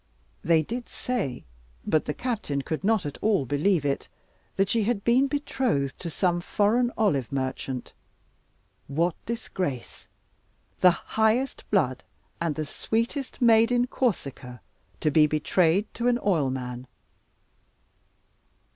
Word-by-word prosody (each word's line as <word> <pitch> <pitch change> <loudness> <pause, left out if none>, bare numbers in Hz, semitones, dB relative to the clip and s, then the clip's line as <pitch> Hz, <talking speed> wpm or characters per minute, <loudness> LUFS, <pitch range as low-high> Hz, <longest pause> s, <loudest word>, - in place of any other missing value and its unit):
They 160 -1 +4
did 240 +8 -5
say, 195 - -3 0.4
but 155 - +2
the 150 - -2
captain 210 - -2
could 160 +5 -3
not 210 -3 +2
at 145 - -5
all 205 -10 +2
believe 145 +4 +1
it, 140 -1 -1 0.5
that 195 - +2
she 225 +3 +1
had 220 -3 0
been 255 +4 +4
betrothed 255 - -1
to 170 - -5
some 175 +3 0
foreign 230 +7 +2
olive 145 - +1
merchant. 130 -1 -3 0.9
What 165 +5 +1
disgrace! 185 - -4 0.7
The 180 - +7
highest 220 +8 0
blood 140 -11 +1 0.4
and 165 -3 0
the 155 - -2
sweetest 235 - -2
maid 230 0 +6
in 245 0 +3
Corsica, 140 - -2 0.4
to 150 - +2
be 150 +1 +5
betrayed 165 +5 +2
to 235 +1 -1
an 245 -1 +3
oilman! 130 - -1
180 Hz, 125 wpm, -26 LUFS, 145-230 Hz, 0.9 s, The